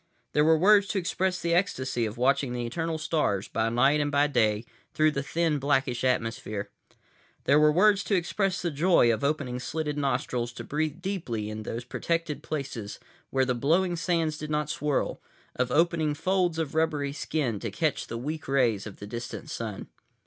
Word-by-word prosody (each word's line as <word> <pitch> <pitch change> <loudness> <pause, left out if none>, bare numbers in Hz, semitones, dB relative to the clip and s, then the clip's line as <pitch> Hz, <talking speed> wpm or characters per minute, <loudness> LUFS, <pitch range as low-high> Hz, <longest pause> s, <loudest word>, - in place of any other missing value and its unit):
There 150 - +4
were 160 +1 +5
words 200 +4 +5
to 205 - -2
express 185 0 0
the 170 -1 0
ecstasy 130 - 0
of 110 - -7
watching 135 +1 +2
the 120 -1 -2
eternal 165 +6 -2
stars, 155 - 0
by 110 0 0
night 135 +6 +3
and 145 0 -1
by 145 0 +4
day, 110 -6 +1 0.3
through 155 0 +4
the 140 - -2
thin 160 +1 0
blackish 135 -3 +1
atmosphere. 115 -4 -1 0.7
There 145 +2 +4
were 150 0 +6
words 200 +4 +4
to 200 - +1
express 185 +2 0
the 170 - 0
joy 150 -5 +4
of 110 - -4
opening 140 -4 -1
slitted 150 +3 -3
nostrils 125 -3 -1
to - - -7
breathe 155 +3 -2
deeply 120 - -3
in 110 0 -5
those 115 +2 -5
protected 165 +2 -2
places 135 -8 -5 0.3
where 135 -1 +2
the 130 - +1
blowing 170 +9 +2
sands 165 -2 0
did 150 - -5
not 150 -1 -1
swirl, 150 -2 -1 0.3
of 125 0 0
opening 160 -2 +2
folds 180 0 +1
of 160 -4 -2
rubbery 150 -3 0
skin 140 -7 -2
to 115 - -4
catch 140 +9 -1
the 115 - -5
weak 150 +6 -5
rays 120 -7 +1
of 100 - -10
the 100 - -8
distant 120 +3 -6
Sun. 110 -4 -5
145 Hz, 185 wpm, -27 LUFS, 120-165 Hz, 0.7 s, were